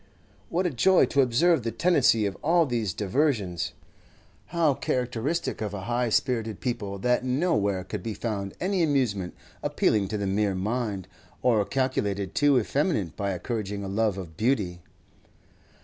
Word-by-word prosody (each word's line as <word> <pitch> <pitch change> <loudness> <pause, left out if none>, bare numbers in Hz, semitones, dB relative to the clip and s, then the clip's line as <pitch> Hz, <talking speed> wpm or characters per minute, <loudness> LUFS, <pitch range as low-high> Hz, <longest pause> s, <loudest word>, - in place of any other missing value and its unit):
What 180 +2 0
a 175 - +1
joy 185 +9 +4
to 140 - +2
observe 140 +6 +3
the 115 - -2
tendency 130 -8 +3
of 100 - -2
all 170 +2 +3
these 115 - -1
diversions! 105 - 0 0.7
How 165 -4 +2
characteristic 125 +5 -2
of 105 -2 -3
a 100 - -5
high 120 +4 0
spirited 110 -2 0
people 105 -6 -3
that 125 +5 +1
nowhere 125 - +1
could 95 +2 -5
be 110 +2 -4
found 100 -4 -4
any 190 0 0
amusement 125 - 0 0.3
appealing 105 -3 +1
to 105 - -3
the 100 - -2
mere 100 0 +1
mind, 105 -1 -2 0.4
or 115 -4 +4
calculated 100 -8 -1
to 145 -2 +4
effeminate 130 - -1
by 100 -1 -2
encouraging 105 0 -4
a - - -4
love 105 0 0
of 85 -4 -8
beauty. 105 - 0
115 Hz, 150 wpm, -26 LUFS, 100-135 Hz, 0.7 s, joy